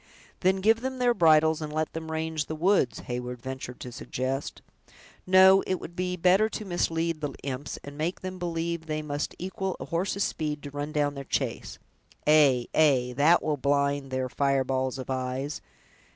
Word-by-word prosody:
"Then 190 +1 +2
give 225 +3 +4
them 260 0 -3
their 245 -1 +3
bridles, 160 -4 +4
and 155 -1 -4
let 155 +1 -2
them 160 0 -6
range 160 -1 -2
the 155 - -4
woods," 175 -5 +2
Heyward 125 0 -5
ventured 130 0 -7
to 125 - -6
suggest. 130 +3 -4 0.6
"No; 190 +1 +7
it 185 - +1
would 175 -1 -9
be 180 0 -1
better 185 +5 +4
to 215 - -5
mislead 165 -3 -1
the 145 - -3
imps, 140 +1 -4
and 145 +1 -10
make 170 +4 -2
them 185 0 -6
believe 170 -1 -3
they 155 0 -2
must 145 0 -3
equal 190 +1 -4
a - - -5
horse's 190 +4 -1
speed 150 -2 -3
to 145 - -7
run 145 +1 -4
down 145 -2 +1
their 140 -1 -6
chase. - - -3 0.5
Ay, 145 -5 +5
ay, 130 -5 +3
that 155 +6 +4
will 150 -2 0
blind 140 0 +1
their 130 0 -1
fireballs 130 -1 0
of 130 0 -5
eyes! 130 +2 -3
155 Hz, 180 wpm, -27 LUFS, 135-175 Hz, 0.6 s, No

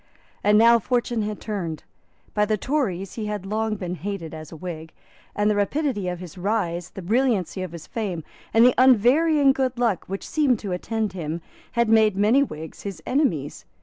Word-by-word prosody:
And 210 +1 +5
now 235 +1 +6
fortune 240 0 0
had 210 0 -3
turned. 175 -8 -4 0.5
By 210 0 +2
the 215 0 0
Tories 200 - -1
he 220 -2 -4
had 210 -2 -4
long 215 +2 -1
been 180 -3 -4
hated 180 -2 -5
as 155 -1 -9
a - - -8
Whig; 160 -2 -7 0.4
and 205 0 +1
the 210 - +3
rapidity 205 -1 0
of 180 0 -2
his 180 +1 -10
rise, 180 -4 -1
the 190 - -9
brilliancy 215 -3 +1
of 185 -3 -4
his 170 -2 -9
fame, 190 -8 -4 0.3
and 225 +1 +6
the 250 - +6
unvarying 270 +4 +5
good 260 -2 -1
luck 235 -6 0
which 195 +1 -5
seemed 290 -6 +2
to 205 -2 -6
attend 215 +3 -2
him, 165 -2 -4 0.3
had 235 -1 +2
made 220 -3 +4
many 215 +7 +4
Whigs 160 - -5
his 200 -3 -7
enemies. 195 - 0
210 Hz, 185 wpm, -24 LUFS, 180-235 Hz, 0.5 s, now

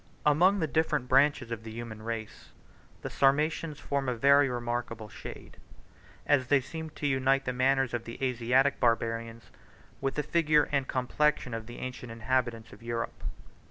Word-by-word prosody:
] - - -30
Among 185 +6 +4
the 165 - +1
different 150 -4 0
branches 135 -2 +3
of 115 -2 -4
the 110 - -9
human 110 -1 -7
race, 110 -1 -6 0.5
the - - -3
Sarmatians 150 +2 +1
form 140 -2 -1
a 125 - -1
very 140 +3 +5
remarkable 120 -2 -3
shade; - - -10 0.7
as 130 -3 +3
they 145 +1 +4
seem 160 +4 -7
to - - -4
unite 135 0 +2
the 125 - -1
manners 130 0 +2
of 120 -1 -3
the 115 - -7
Asiatic 130 +2 +2
barbarians 115 -1 -1 0.5
with 135 0 -1
the 150 - 0
figure 155 -2 +3
and 140 -2 0
complexion 130 0 0
of 115 -1 -5
the 120 - -9
ancient 125 -2 -6
inhabitants 115 -1 -1
of - - -14
Europe. 115 0 -4
130 Hz, 165 wpm, -29 LUFS, 115-140 Hz, 0.7 s, very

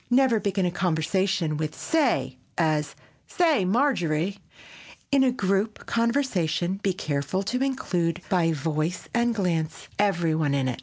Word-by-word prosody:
Never 250 -2 +4
begin 195 -2 0
a 175 - 0
conversation 175 -1 0
with 155 0 -3
"Say," 320 -2 +1 0.2
as 155 -3 +1 0.3
"Say, 315 - +2
Marjorie." 195 - +1 0.7
In 275 -1 +5
a 260 - +3
group 205 -1 -1
conversation 210 - 0
be 195 - +1
careful 155 +1 -2
to 250 +6 -2
include, 180 - -1
by 170 -3 +2
voice 155 +2 -2
and 235 -1 +2
glance, 165 -6 -2
every 175 -6 +2
one 150 -3 +1
in 135 -2 0
it. 125 - -3
185 Hz, 140 wpm, -25 LUFS, 160-230 Hz, 0.7 s, In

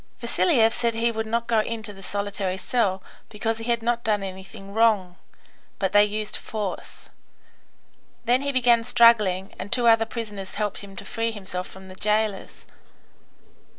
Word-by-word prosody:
Vasiliev 230 -10 +3
said 235 -2 0
he 230 +1 +1
would 220 -1 -3
not 230 +1 -1
go 230 -1 +2
into 215 -1 -3
the 195 - -13
solitary 200 -1 -3
cell, 195 -2 0 0.3
because 225 +1 -2
he 225 - -6
had 235 -1 0
not 235 0 0
done 210 -3 +1
anything 195 +1 -9
wrong; 210 -5 +2 0.6
but 190 -1 -1
they 205 0 +7
used 210 0 -3
force. 210 -4 -6 1.2
Then 245 +2 +3
he 280 0 -1
began 240 -3 +3
struggling, 225 -6 +4
and 190 - -6
two 245 -1 +1
other 225 -1 +5
prisoners 210 -5 -6
helped 210 -1 -2
him 200 -1 -11
to - - -9
free 230 0 -2
himself 190 -4 -5
from 190 0 -13
the 185 - -10
jailers. 210 0 -1
215 Hz, 160 wpm, -24 LUFS, 195-230 Hz, 1.2 s, they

